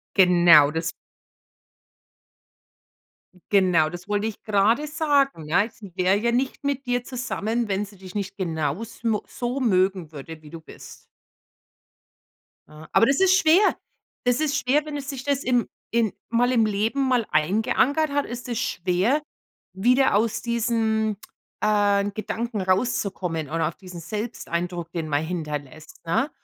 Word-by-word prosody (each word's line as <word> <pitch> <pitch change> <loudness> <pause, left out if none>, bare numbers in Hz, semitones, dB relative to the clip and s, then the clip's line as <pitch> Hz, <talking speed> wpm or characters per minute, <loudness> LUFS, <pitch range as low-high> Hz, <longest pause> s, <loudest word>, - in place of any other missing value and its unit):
Genau, 175 -6 +6
das 165 +2 -2 2.6
genau, 180 -6 +4
das 175 +3 -9
wollte 205 +1 0
ich 220 - -6
gerade 215 +7 +2
sagen, 285 - +1
ja? 195 +7 +2
Sie 205 -4 -13
wäre 185 +1 +3
ja 235 +2 0
nicht 260 +4 -1
mit 280 -1 -1
dir 245 0 0
zusammen, 240 -3 -2
wenn 200 +1 0
sie 200 0 -16
dich 185 -1 -12
nicht 195 -2 -4
genaus 175 +4 -3
mo 220 -3 +1
so 250 0 -4
mögen 185 - +1
würde, 155 +2 -9
wie 150 - -13
du 165 - -9
bist. 160 - -13 1.6
Ah, 155 +1 -13
aber 230 - +5
das 275 - +2
ist 375 -1 +5
schwer. 365 +4 +4 0.5
Das 245 +2 +2
ist 300 -2 0
schwer, 275 +3 +1
wenn 300 -1 -6
es 280 -1 -6
sich 270 -3 -5
das 280 -1 0
im 245 -2 +1 0.2
in 230 -3 +1 0.2
mal 245 +2 +2
im 230 -3 +3
Leben 220 +7 0
mal 245 -4 +2
eingeankert 225 - +2
hat, 285 0 0
ist 245 +2 -7
es 235 - -2
schwer, 190 - 0 0.5
wieder 250 +8 +3
aus 220 +1 +1
diesen, 225 -2 0 0.4
äh, 205 -1 +2
Gedanken 220 +2 -4
rauszukommen 185 - -1
oder 165 +2 0
aus 165 - -10
diesen 180 -3 -10
Selbsteindruck, 175 -4 -4
den 165 -2 -3
man 145 +1 0
hinterlässt, 155 -3 -6
ne? 215 - +1
210 Hz, 150 wpm, -24 LUFS, 180-245 Hz, 2.6 s, Genau